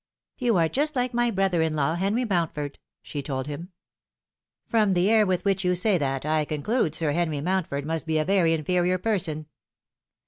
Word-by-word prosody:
"You 235 -5 +2
are 165 -1 +3
just 295 - 0
like 250 -1 0
my 240 0 +2
brother 190 -5 +1
in 160 -1 0
law, 150 +1 +1
Henry 200 +8 0
Mountford," 165 -7 -2 0.2
she 145 - -5
told 130 -2 -4
him. 150 +5 -7 0.5
" - - -67
From 215 -4 +2
the 180 +4 +2
air 215 -2 +4
with 185 0 -1
which 195 -1 +1
you 180 0 +2
say 185 +1 +3
that, 135 -1 -2
I 155 0 +1
conclude 155 - -1
Sir 160 -3 +1
Henry 160 -2 -1
Mocntford 160 -4 -1
must 160 +1 -3
be 160 -1 +1
a 155 - +1
very 185 -4 +3
inferior 180 +3 +1
person." 180 -7 -1
175 Hz, 195 wpm, -25 LUFS, 155-200 Hz, 0.5 s, air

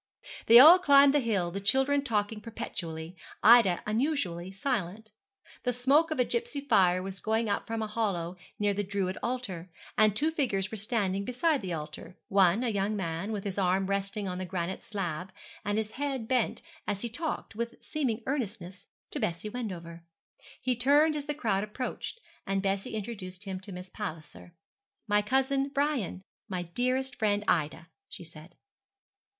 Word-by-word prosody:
They 230 - +10
all 320 +8 +11
climbed 280 -5 +6
the 295 - +4
hill, 200 -9 0
the 195 +3 -4
children 270 +7 +3
talking 210 -3 -1
perpetually, 175 -7 -6 0.3
Ida 220 -5 +7
unusually 210 - -1
silent. 210 -1 -3 0.5
The 250 - 0
smoke 275 +7 +3
of 310 - -2
a 250 - +4
gipsy 470 - -2
fire 190 -9 +3
was 190 0 -6
going 220 +2 0
up 205 - -1
from 225 -1 -2
a - - -2
hollow 195 -6 -2 0.2
near 205 -1 +1
the 205 - -1
Druid 195 -1 -2
altar, 215 -9 -4 0.3
and 215 -1 +5
two 305 +8 +1
figures 210 -11 -1
were 220 - -4
standing 200 -3 0
beside 270 +6 +1
the 185 -3 -4
altar; 155 +4 -7
one, 195 +3 +4
a 245 - +1
young 205 0 0
man, 170 +1 -3
with 205 -2 -3
his 200 -1 -3
arm 190 0 +2
resting 200 +1 -1
on 180 0 -3
the 185 - -3
granite 180 0 -3
slab, 185 -3 -4 0.3
and 205 +1 -1
his 220 -1 -2
head 270 -4 -3
bent 250 -2 0 0.2
as 200 -1 -1
he 240 - -2
talked, 295 +2 -4
with 235 +1 -3
seeming 250 -7 -2
earnestness, 205 -9 -4 0.2
to 295 - -4
Bessie 210 -2 -2
Wendover. 175 -8 -6 0.6
He 255 -1 +1
turned 290 +6 +4
as 290 0 -4
the 295 - -2
crowd 210 -8 0
approached, 250 - -5 0.3
and 195 0 0
Bessie 195 +2 -1
introduced 195 -3 -6
him 190 -2 -5
to 195 +2 -10
Miss 180 0 -8
Palliser. 175 -3 -7 0.5
'My 210 0 +3
cousin 270 +4 +1
Brian 280 - -1 0.3
my 180 -2 -2
dearest 250 +8 -1
friend 205 -1 +1
Ida,' 160 +1 0 0.2
she - - -8
said. 160 +1 -12
210 Hz, 170 wpm, -29 LUFS, 185-250 Hz, 0.6 s, all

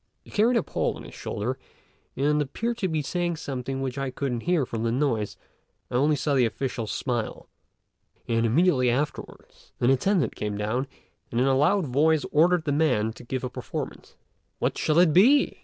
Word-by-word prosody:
He - - -16
carried 230 +4 +3
a - - +1
pole - - -1
on - - -10
his - - -11
shoulder, 125 +6 -4 0.6
and 150 +2 +2
appeared 230 - -3
to 190 - 0
be 160 -3 -1
saying 175 +3 -1
something 135 -3 -4
which 130 0 -3
I 135 -1 -2
couldn't 130 -2 -3
hear 170 -7 +3
for 115 - -5
the 115 +1 0
noise; 120 -5 -1 0.5
I - - -8
only 145 +5 +3
saw 145 +1 -1
the 130 -3 +4
officials 115 -2 -4
smile, 120 -4 -3 0.8
and 115 0 +1
immediately 130 +1 +3
afterwards 140 +5 -4
an 120 - +3
attendant 170 +5 +1
came 105 -1 -3
down, 115 +6 -1 0.4
and 115 - -1
in 130 - +3
a 135 - +3
loud 175 +7 +3
voice 150 +4 +2
ordered 170 +2 +4
the 145 - 0
man 125 -8 +1
to 125 - -13
give 130 +2 -4
a - - -1
performance. - - -6 0.4
"What - - -1
shall 155 - +1
it 175 -3 +5
be?" 255 +11 +5
135 Hz, 190 wpm, -26 LUFS, 125-160 Hz, 0.8 s, it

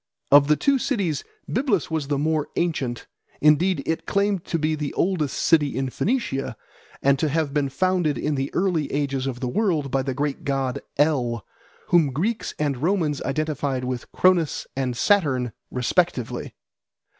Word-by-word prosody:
Of 140 0 +7
the 150 - +5
two 275 - +2
cities 195 - -1 0.2
Byblus 225 - 0
was 155 -3 -1
the 145 -1 0
more 155 +1 0
ancient; 140 -8 -1 0.3
indeed 165 +5 +3
it 160 - -2
claimed 200 -2 +1
to 165 - -1
be 155 0 0
the 150 -2 -3
oldest 165 -7 0
city 150 -5 +3
in 135 -1 -1
Phoenicia, 135 - -1 0.5
and 140 0 +4
to 155 - +1
have 150 -1 0
been 145 -2 +1
founded 180 -1 +1
in 150 - -1
the 135 0 -2
early 175 -6 +1
ages 140 -2 -1
of 125 -2 -4
the 125 - -1
world 155 - 0
by 135 - +1
the 130 -1 -3
great 145 +4 -2
god 135 -3 -1 0.2
El, 130 -6 +1 0.4
whom 165 -6 +4
Greeks 210 - -2
and 145 -3 0
Romans 160 -4 +1
identified 140 -2 -1
with 125 -1 -4
Cronus 180 -5 +2
and 130 -3 -2
Saturn 135 - +2 0.2
respectively. 125 0 -1
150 Hz, 160 wpm, -24 LUFS, 135-175 Hz, 0.5 s, Of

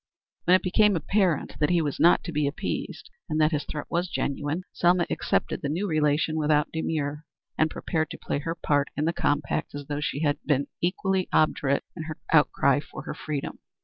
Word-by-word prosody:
When 180 - +6
it 185 - +2
became 205 +2 +4
apparent 180 -2 0
that 150 - +2
he 175 -1 +3
was 150 -4 -2
not 170 - +5
to 170 - -5
be 150 -2 +1
appeased 140 - -4 0.2
and 155 - 0
that 155 +1 +4
his 150 -2 -1
threat 150 - -5
had - - +2
been - - -9
genuine, 145 +5 -2
Selma 175 0 +3
accepted - - 0
the 145 - -2
new 180 +7 -1
relation 155 -1 +1
without 150 -1 +2
demur, 150 -2 -2 0.3
and 155 - +2
prepared 160 -1 -2
to - - -7
play - - -3
her 165 +3 -3
part 145 -4 +1
in 150 - +1
the 165 - +1
compact 145 -2 -1
as 145 -1 -6
though 145 +1 -3
she 145 0 -2
had 145 -2 +1
been 140 -2 +1 0.2
equally 190 +1 0
obdurate 140 -2 +2
in 160 -3 -6
her 155 -1 -6 0.2
outcry 145 -2 +4
for 145 - -9
her - - -5
freedom. 150 -3 -5
155 Hz, 205 wpm, -26 LUFS, 145-170 Hz, 0.3 s, When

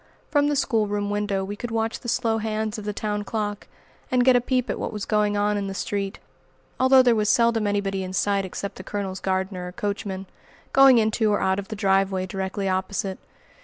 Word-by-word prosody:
From 290 -1 +3
the 295 - +1
schoolroom 205 -6 0
window 205 -2 -1
we 205 +1 -5
could 240 +3 -5
watch 225 0 -1
the 240 - -6
slow 225 -2 +1
hands 215 0 -2
of 210 - -8
the 210 - -1
town 210 0 -3
clock 205 -1 -3 0.4
and 250 -1 +2
get 260 -1 +6
a 245 - +4
peep 255 0 0
at - - -3
what - - -3
was 210 -2 -4
going 210 -1 +1
on 205 0 +1
in 200 -1 -2
the 195 - -5
street, 200 +1 -3 0.6
although 260 0 +6
there 245 -2 +5
was 215 -2 +1
seldom 230 -2 +3
anybody 195 -1 -1
in 185 - -5
sight 195 +2 +1
except 195 +1 -6
the 185 - -8
Colonel's 195 -1 -4
gardener 190 -1 -2
or - - -6
coachman, 195 -1 -3 0.5
going 270 -2 +7
into 220 -1 +2
or 205 - +2
out 190 +1 +1
of 200 - -6
the 215 - -5
driveway 195 -2 +1
directly 195 +1 -3
opposite. 190 0 -2
205 Hz, 210 wpm, -24 LUFS, 195-225 Hz, 0.6 s, going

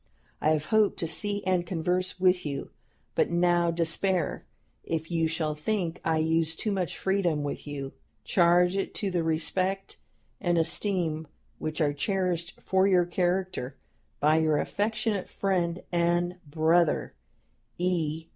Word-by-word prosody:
I 155 - +3
have 155 -1 +1
hoped 215 +3 +3
to - - -1
see 205 +5 0
and 185 -2 +2
converse 180 +2 -1
with 180 -1 +3
you, 140 -2 -4 0.4
but - - +2
now 175 0 +3
despair. 170 +1 0 0.4
If 160 0 -3
you 165 -1 +2
shall 160 -1 -1
think 170 +2 -2
I 160 -1 +1
use 160 0 +1
too 215 - -2
much 185 -4 -2
freedom 180 -6 0
with 145 +1 -5
you, 140 -2 -5 0.3
charge 175 +1 +4
it 195 - -2
to 200 -2 -1
the 175 -2 +1
respect 185 +4 -1 0.4
and 175 -1 +1
esteem 165 -2 0 0.3
which 155 +1 -3
are 145 -2 +2
cherished 175 +2 -1
for 190 0 +2
your 180 -3 +4
character 175 -6 -1 0.4
by 155 +2 +4
your 155 -2 +2
affectionate 215 0 -1
friend 180 -3 -1
and 175 +1 +1
brother, 160 +2 +2 0.6
"E. 165 -3 -1
175 Hz, 140 wpm, -28 LUFS, 160-185 Hz, 0.6 s, charge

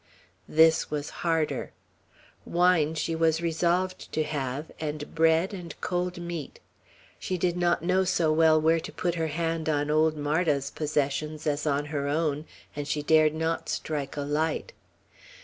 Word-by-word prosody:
This 160 +1 +4
was 150 -1 -3
harder. 165 -2 -1 0.7
Wine 170 -3 +2
she 160 +1 -1
was 160 -1 +2
resolved 175 +3 0
to 155 - +1
have 145 -1 -4
and 150 -1 -5
bread 165 +4 +3
and 175 -4 -8
cold 180 0 -2
meat. 170 -4 -6 0.6
She 185 - -2
did 175 0 0
not 175 -2 +1
know 185 +2 +2
so 170 -4 +2
well 160 0 +5
where 160 +1 +3
to - - -8
put 175 -1 -1
her 165 -1 -1
hand 165 +1 -2
on 145 -1 0
old 155 0 +3
Marda's 145 -2 0
possessions 150 0 -2
as 150 0 -1
on 145 0 +1
her 140 -1 -1
own, 150 0 0 0.3
and 145 -1 -4
she 150 0 -1
dared 155 0 +4
not 160 +1 -2
strike 145 -2 -3
a - - -1
light. 155 - -1
160 Hz, 155 wpm, -27 LUFS, 150-170 Hz, 0.7 s, well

